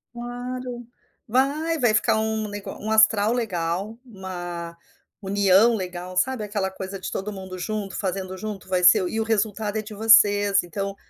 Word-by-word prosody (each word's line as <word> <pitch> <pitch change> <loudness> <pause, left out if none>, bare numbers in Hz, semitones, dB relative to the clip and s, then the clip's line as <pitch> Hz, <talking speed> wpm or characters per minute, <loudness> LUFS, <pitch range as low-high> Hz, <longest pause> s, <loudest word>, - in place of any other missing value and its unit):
Claro, 245 0 -6 0.4
vai, 290 +7 +1
vai 240 -4 +3
ficar 215 0 +2
um 220 0 -1
ne 205 0 -6
um 220 - -5
astral 220 0 +4
legal, 195 -2 -2
uma 175 -5 -7 0.4
união 200 +2 +4
legal 180 -2 -6
sabe 245 +5 0
aquela 205 -2 -2
coisa 190 +1 -7
de - - -5
todo 210 +2 -4
mundo 190 -1 -8
junto 200 +1 -4
fazendo 190 -1 -3
junto 205 -1 -7
vai 185 -1 0
ser 185 0 +6
e 220 - -3
o - - +1
resultado 215 -1 -1
é - - -2
de 215 0 -10
vocês 205 -2 +5
então, 195 +3 -5
205 Hz, 160 wpm, -24 LUFS, 190-225 Hz, 0.4 s, ser